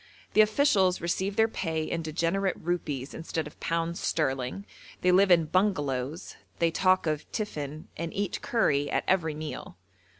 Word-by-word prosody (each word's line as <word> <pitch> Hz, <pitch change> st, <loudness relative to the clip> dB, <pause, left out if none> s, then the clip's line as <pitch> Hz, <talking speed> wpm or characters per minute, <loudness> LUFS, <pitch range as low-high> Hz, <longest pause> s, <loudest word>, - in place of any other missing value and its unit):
The 215 Hz, -, +7 dB
officials 210 Hz, -5 st, +3 dB
receive 190 Hz, +3 st, -1 dB
their 220 Hz, +1 st, +4 dB
pay 160 Hz, -7 st, -2 dB
in 165 Hz, +1 st, -2 dB
degenerate 170 Hz, +5 st, 0 dB
rupees 150 Hz, -6 st, -3 dB
instead 160 Hz, -1 st, -3 dB
of 150 Hz, -, -12 dB
pounds 165 Hz, +1 st, -1 dB
sterling, 135 Hz, +4 st, -1 dB, 0.4 s
they 180 Hz, -, +4 dB
live 190 Hz, +2 st, +5 dB
in 170 Hz, -3 st, +5 dB
'bungalows,' 150 Hz, -5 st, -1 dB, 0.2 s
they 170 Hz, -1 st, +2 dB
talk 185 Hz, +2 st, +3 dB
of 155 Hz, -2 st, -2 dB
'tiffin,' 155 Hz, -8 st, -4 dB
and 165 Hz, 0 st, -3 dB
eat 200 Hz, -1 st, -2 dB
curry 145 Hz, -11 st, +1 dB
at -, -, 0 dB
every 160 Hz, -5 st, +1 dB
meal. 155 Hz, 0 st, -7 dB
170 Hz, 155 wpm, -28 LUFS, 155-190 Hz, 0.4 s, The